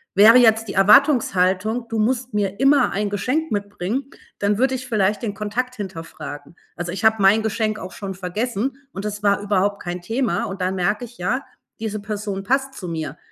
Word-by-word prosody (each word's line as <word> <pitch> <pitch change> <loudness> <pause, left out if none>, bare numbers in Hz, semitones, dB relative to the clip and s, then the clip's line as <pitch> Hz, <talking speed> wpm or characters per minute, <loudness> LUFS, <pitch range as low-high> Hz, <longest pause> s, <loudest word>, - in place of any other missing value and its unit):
wäre 215 +5 +8
jetzt 225 -3 +4
die - - -5
Erwartungshaltung: 210 -1 +3
„Du 225 - -2
musst 250 +3 0
mir 200 -1 -1
immer 275 -1 +4
ein 205 +1 -1
Geschenk 255 +11 -1
mitbringen“, 205 +6 -3 0.3
dann 200 0 +1
würde 260 +2 +2
ich 255 0 -6
vielleicht 210 -3 +1
den 220 -4 -3
Kontakt 225 +5 -3
hinterfragen. 165 - -8 0.2
Also, 175 0 -4
ich 195 - -5
habe 220 -1 +4
mein 200 +3 +5
Geschenk 215 0 -1
auch 185 - -7
schon 195 -2 -6
vergessen 215 +7 -3 0.2
und 195 - -5
das 210 0 -5
war 200 -1 +3
überhaupt 200 0 0
kein 175 0 -4
Thema 235 +4 -1
und 195 -3 -6
dann 185 +1 0
merke 205 +5 0
ich: 240 0 -10
„Ja, 250 +10 -1 0.4
diese 215 -1 -3
Person 205 -1 -4
passt 270 +4 0
zu 180 - -7
mir.“ 160 -2 -4
210 Hz, 190 wpm, -21 LUFS, 195-240 Hz, 0.4 s, wäre